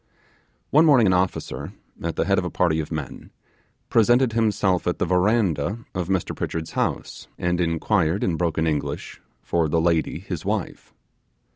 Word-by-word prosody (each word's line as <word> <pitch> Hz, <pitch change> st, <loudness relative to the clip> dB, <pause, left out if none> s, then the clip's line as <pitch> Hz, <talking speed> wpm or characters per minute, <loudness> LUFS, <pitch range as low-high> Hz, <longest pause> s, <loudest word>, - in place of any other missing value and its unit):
One 155 Hz, +3 st, +6 dB
morning 130 Hz, -7 st, +6 dB
an 95 Hz, -, +4 dB
officer, 90 Hz, 0 st, -2 dB, 0.3 s
at -, -, -3 dB
the -, -, 0 dB
head -, -, +2 dB
of -, -, -2 dB
a -, -, -2 dB
party 80 Hz, -3 st, +1 dB
of 80 Hz, -, -4 dB
men, 75 Hz, -5 st, -6 dB, 0.6 s
presented 120 Hz, +2 st, +3 dB
himself 105 Hz, -5 st, +1 dB
at 90 Hz, -, 0 dB
the -, -, 0 dB
verandah 95 Hz, +1 st, +1 dB
of 90 Hz, -2 st, -3 dB
Mr 95 Hz, -2 st, -1 dB
Pritchard's 80 Hz, -1 st, -4 dB
house, -, -, -3 dB
and 90 Hz, 0 st, 0 dB
inquired 85 Hz, +2 st, +1 dB
in 90 Hz, -, +1 dB
broken 80 Hz, -1 st, 0 dB
English 75 Hz, -2 st, -3 dB, 0.2 s
for 85 Hz, -2 st, 0 dB
the 80 Hz, -, +2 dB
lady 80 Hz, -2 st, +1 dB
his 90 Hz, -2 st, -6 dB
wife. 105 Hz, -1 st, -3 dB
90 Hz, 160 wpm, -23 LUFS, 80-105 Hz, 0.6 s, One